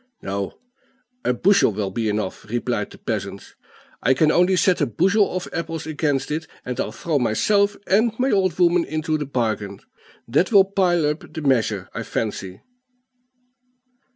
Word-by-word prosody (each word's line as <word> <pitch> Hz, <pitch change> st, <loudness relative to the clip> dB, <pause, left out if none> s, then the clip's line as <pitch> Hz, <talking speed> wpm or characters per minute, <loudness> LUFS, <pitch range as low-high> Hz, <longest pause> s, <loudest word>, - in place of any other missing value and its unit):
"No; 100 Hz, 0 st, -4 dB, 0.7 s
a -, -, +2 dB
bushel 175 Hz, -, +3 dB
will 100 Hz, -1 st, -3 dB
be 110 Hz, +2 st, -1 dB
enough," 105 Hz, 0 st, -3 dB
replied 120 Hz, -2 st, -2 dB
the -, -, -13 dB
peasant. 100 Hz, -3 st, -5 dB, 0.5 s
"I 130 Hz, +4 st, +3 dB
can 155 Hz, +2 st, +3 dB
only 180 Hz, +3 st, +3 dB
set 185 Hz, 0 st, +2 dB
a -, -, +2 dB
bushel 195 Hz, -, +2 dB
of 185 Hz, -, -3 dB
apples 165 Hz, -2 st, -4 dB
against 150 Hz, -3 st, -1 dB
it, 160 Hz, +2 st, -3 dB, 0.2 s
and 125 Hz, -1 st, -4 dB
I'll -, -, -1 dB
throw 150 Hz, +6 st, -1 dB
myself 200 Hz, -, +2 dB
and 220 Hz, +4 st, +3 dB
my 260 Hz, +2 st, +1 dB
old 185 Hz, -4 st, +1 dB
woman 175 Hz, -1 st, +4 dB
into 155 Hz, 0 st, -2 dB
the 145 Hz, -, -4 dB
bargain; 110 Hz, -6 st, -2 dB, 0.5 s
that 145 Hz, -, +2 dB
will 200 Hz, -3 st, +7 dB
pile 180 Hz, -4 st, +1 dB
up 150 Hz, +2 st, -3 dB
the 160 Hz, -, -6 dB
measure, 110 Hz, -8 st, +1 dB
I 115 Hz, -, -4 dB
fancy." 100 Hz, -4 st, -4 dB
150 Hz, 160 wpm, -22 LUFS, 110-180 Hz, 0.7 s, will